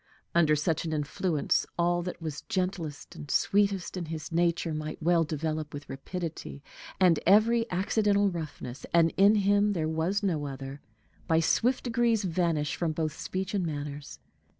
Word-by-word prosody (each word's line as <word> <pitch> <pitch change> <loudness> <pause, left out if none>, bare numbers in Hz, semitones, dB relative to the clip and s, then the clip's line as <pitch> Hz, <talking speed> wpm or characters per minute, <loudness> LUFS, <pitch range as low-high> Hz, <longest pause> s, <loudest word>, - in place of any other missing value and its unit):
Under 160 -3 +4
such 150 +1 0
an 160 -1 -3
influence 150 +2 0
all 175 0 +2
that 180 +1 -5
was 155 -3 -5
gentlest 180 -6 -3
and 145 - -9
sweetest 200 0 +1
in 180 -2 -3
his 160 +1 -6
nature 170 -1 +1
might 155 0 -5
well 170 +1 +3
develop 155 -1 -3
with 145 - -8
rapidity, 155 0 -6 0.4
and 180 -4 +5
every 225 +4 +4
accidental 200 +2 +2
roughness 150 -6 -6
and 165 -1 +4
in 200 +2 +6
him 205 0 +3
there 160 -4 -1
was 165 +6 -1
no 160 -7 0
other 135 +1 -7 0.5
by 160 -2 +3
swift 240 +10 +2
degrees 235 -2 +1
vanish 165 -4 0
from 165 -3 -1
both 155 -1 -2
speech 190 +1 -4
and 195 -3 0
manners. 145 -2 -5
170 Hz, 155 wpm, -28 LUFS, 155-190 Hz, 0.5 s, in